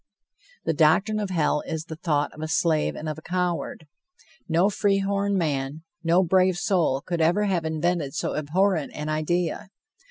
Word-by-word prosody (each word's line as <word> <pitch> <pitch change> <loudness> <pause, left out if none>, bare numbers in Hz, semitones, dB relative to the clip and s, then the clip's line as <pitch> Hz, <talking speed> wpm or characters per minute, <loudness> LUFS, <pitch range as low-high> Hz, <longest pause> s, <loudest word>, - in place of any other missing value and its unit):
The - - +1
doctrine 190 +8 +3
of 205 -2 -2
hell 155 -4 +1
is 160 -1 -3
the 160 - -7
thought 150 -3 -1
of 155 - -10
a 155 - -3
slave 155 0 +1
and 155 - -6
of 155 0 -4
a - - -15
coward. 175 -2 -2 0.6
No 170 +4 +3
free 200 -1 +1
horn 200 0 0
man, 145 -2 -2 0.2
no 170 +3 +4
brave 185 0 +3
soul 170 -8 +1
could 170 -2 -2
ever 175 +6 +3
have 185 -5 0
invented 160 -2 -1
so - - -2
abhorrent 160 +2 0
an 150 +1 -4
idea. 175 +6 -1
170 Hz, 170 wpm, -25 LUFS, 155-185 Hz, 0.6 s, no